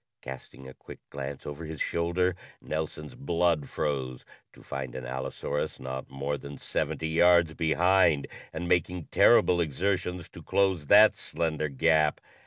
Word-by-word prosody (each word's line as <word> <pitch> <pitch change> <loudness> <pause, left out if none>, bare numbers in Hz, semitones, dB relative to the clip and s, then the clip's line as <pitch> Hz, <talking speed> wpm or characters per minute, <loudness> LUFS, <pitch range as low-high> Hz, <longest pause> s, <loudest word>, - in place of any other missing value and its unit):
Casting 65 +1 -9
a 65 - -10
quick - - -12
glance 70 0 -6
over 75 +3 -6
his 80 -2 -7
shoulder, 85 +2 0 0.2
Nelson's 75 -1 -5
blood 85 -1 0
froze 65 -4 -3 0.3
to - - -18
find 65 -1 -6
an 65 - -6
allosaurus 65 +3 -4
not 65 +1 -6
more 70 +2 -3
than 70 0 -9
seventy 80 +3 -2
yards 85 0 +4
behind, 85 -1 +3 0.3
and 85 +2 -5
making 90 -1 0
terrible 85 -1 +5
exertions 90 +2 -2
to - - -12
close 95 -7 +1
that 105 +4 +7
slender 80 -2 -2
gap! 75 +2 +2
80 Hz, 140 wpm, -28 LUFS, 70-85 Hz, 0.3 s, that